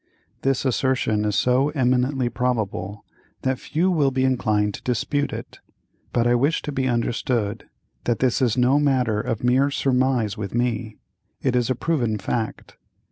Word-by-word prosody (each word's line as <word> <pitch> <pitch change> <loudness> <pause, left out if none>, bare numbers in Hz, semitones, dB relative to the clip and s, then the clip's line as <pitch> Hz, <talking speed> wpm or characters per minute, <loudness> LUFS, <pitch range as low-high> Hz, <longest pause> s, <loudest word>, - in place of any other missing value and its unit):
This 135 0 0
assertion 125 -4 +1
is 105 -1 0
so 125 +5 +3
eminently 130 -2 +1
probable 110 -5 -2 0.4
that 130 -1 0
few 175 +4 0
will 150 -6 +3
be 130 0 0
inclined 105 -5 +1
to - - -8
dispute 135 +4 -1
it, - - -8 0.5
but 120 - +1
I 120 - +4
wish 140 +7 +1
to 150 - -4
be 130 -2 -1
understood 115 -3 -1 0.4
that 120 - +1
this 130 0 +1
is 125 -2 +2
no 130 +3 +4
matter 125 -7 +1
of 115 -2 -3
mere 130 +3 +3
surmise 130 -6 +1
with 100 0 -5
me—it 120 +2 -3
is 125 0 +1
a 130 - +1
proven 120 -7 0
fact. 110 +2 -4
125 Hz, 155 wpm, -23 LUFS, 115-135 Hz, 0.5 s, I